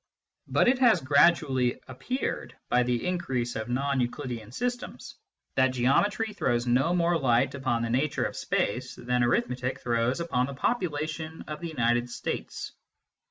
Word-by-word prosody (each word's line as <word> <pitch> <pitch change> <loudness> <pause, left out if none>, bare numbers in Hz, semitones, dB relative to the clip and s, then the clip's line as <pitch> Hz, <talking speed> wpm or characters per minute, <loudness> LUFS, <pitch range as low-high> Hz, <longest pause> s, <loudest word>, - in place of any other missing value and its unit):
But - - +3
it 250 +1 +4
has 245 -4 +5
gradually 140 -3 +3
appeared, 250 - -4
by 125 - +4
the 125 +2 0
increase 135 -10 -1
of 110 +1 -4
non 135 +2 0
Euclidean 120 -3 -4
systems, 245 - -4 0.4
that 130 0 +5
Geometry 205 - +2
throws 120 -11 0
no 125 +6 +2
more 170 -1 +2
light 130 0 +2
upon 130 -4 -1
the 115 - -2
nature 140 +4 +1
of - - -4
space 125 +3 -1
than 125 0 -1
Arithmetic 125 +1 0
throws 120 +3 0
upon 130 -7 0
the 140 - -6
popula 155 - 0
tion 160 0 -6
of 150 -1 -5
the 170 - -4
United 120 -5 +1
States. 120 - -5
130 Hz, 155 wpm, -28 LUFS, 120-165 Hz, 0.4 s, has